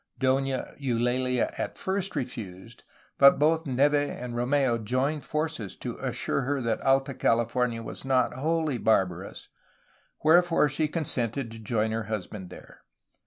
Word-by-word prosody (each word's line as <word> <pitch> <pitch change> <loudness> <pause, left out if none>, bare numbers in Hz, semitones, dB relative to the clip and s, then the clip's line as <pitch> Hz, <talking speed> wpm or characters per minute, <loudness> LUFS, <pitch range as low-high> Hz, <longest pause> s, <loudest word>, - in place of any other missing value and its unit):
Dona 135 0 0
Eulalia 125 -1 0
at - - -3
first 190 -1 -2
refused, 115 -5 -6 0.4
but 140 0 +8
both 160 +2 +2
Neve 140 +3 +3
and 145 -4 -1
Rom^u 120 -1 +1
joined 135 +7 0
forces 150 - -3
to - - -6
assure - - -2
her 140 +2 -1
that 115 -3 -1
Alta 135 +1 +2
Cahfornia 120 -1 0
was - - -7
not 130 -2 +2
wholly 155 -1 -1
barbarous, 95 -4 0 0.7
wherefore 165 0 +5
she 155 +3 0
consented 135 -6 -2
to 115 - -9
join 110 0 0
her 110 0 -2
husband 105 -3 -5
there. - - -13
130 Hz, 135 wpm, -27 LUFS, 115-145 Hz, 0.7 s, but